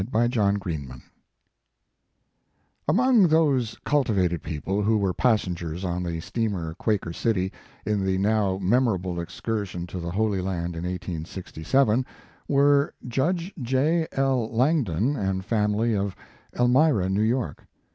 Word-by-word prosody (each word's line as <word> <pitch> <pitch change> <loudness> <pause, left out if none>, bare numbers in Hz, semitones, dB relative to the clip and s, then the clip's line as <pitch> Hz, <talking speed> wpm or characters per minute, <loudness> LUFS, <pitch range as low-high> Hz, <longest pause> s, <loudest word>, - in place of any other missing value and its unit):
101 110 -4 +2
VI 90 -5 -3 0.2
MAEEIAGE 60 - -13 1.9
Among 240 -3 +5
those 145 -8 +2
cultivated 100 - +1
people 95 +7 -2
who 110 +2 +2
were 100 -3 0
passengers 90 -7 0
on 90 0 -2
the 85 -2 -3
steamer 95 -7 -2
Quaker 95 -2 -1
City, 95 -2 0 0.3
in 105 -2 0
the 95 0 +1
now 100 -1 +1
memoiable 95 -5 +1
excursion 95 0 -4
to 90 +1 -6
the 85 0 -4
Holy 100 +1 0
Land 90 -2 -3
in 85 +1 -4
1867, 90 - -1 0.4
were 140 +1 +3
Judge 170 +9 -1
J. 145 +7 +1
L. 130 -4 +1
Langdon 125 - +1
and 95 -5 -2
family 105 +1 +1
of 100 -1 -2 0.4
Elmira, 125 - +3
New 95 +2 0
York. 120 +3 -1
105 Hz, 125 wpm, -25 LUFS, 90-125 Hz, 1.9 s, Among